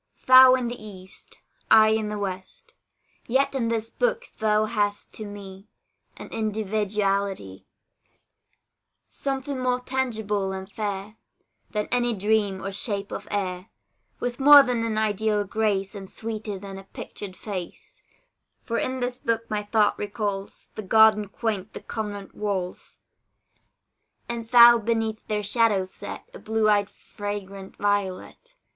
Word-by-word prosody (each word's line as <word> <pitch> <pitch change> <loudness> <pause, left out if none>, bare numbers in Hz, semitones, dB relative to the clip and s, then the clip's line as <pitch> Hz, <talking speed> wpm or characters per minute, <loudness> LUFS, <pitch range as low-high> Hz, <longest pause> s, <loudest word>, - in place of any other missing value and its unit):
Thou 255 0 +9
in 250 -2 -2
the 240 -2 -6
east, 190 -3 -11 0.3
I 220 -1 +7
in 220 -1 0
the 210 - -3
west; 200 - -6 0.5
Yet 275 +3 +2
in 250 -4 0
this 230 0 -2
book - - -1
thou 215 0 +2
hast 205 -2 -2
to 215 - -6
me 200 -1 -10 0.5
An - - -8
individuality; 200 - -2 1.4
Something 270 0 -3
more 250 0 +1
tangible 220 -7 -2
and 190 0 -6
fair 205 +1 -5 0.5
Than 210 -1 -2
any 240 -1 +1
dream 205 -1 0
or 195 - -2
shape 200 0 -3
of - - -6
air, 185 -2 -3 0.5
With 245 +1 -3
more 285 +1 +9
than 245 -3 -1
an 225 -1 -1
ideal 215 0 +1
grace, 200 -1 -1
And 195 -2 -8
sweeter 220 -2 -5
than 195 0 -8
a 195 - -13
pictured 195 0 -8
face: 190 -5 -8 0.6
For 230 -1 -2
in 260 0 -2
this 245 0 -2
book 230 -1 -1
my 210 -1 0
thought 210 0 +1
recalls 205 -1 -4
The - - -6
garden 215 +1 +5
quaint, 210 -1 -3
the - - -6
convent 205 -3 -6
walls. 195 -4 -4 1.3
And 235 -1 -4
thou 240 -1 +9
beneath 225 -1 -2
their 210 -1 -1
shadow 210 -2 +2
set, 185 - -8
A - - -10
blue 220 0 0
eyed 205 -1 +3
fragrant 200 -1 -7
violet. 205 - -2
215 Hz, 140 wpm, -25 LUFS, 200-230 Hz, 1.4 s, Thou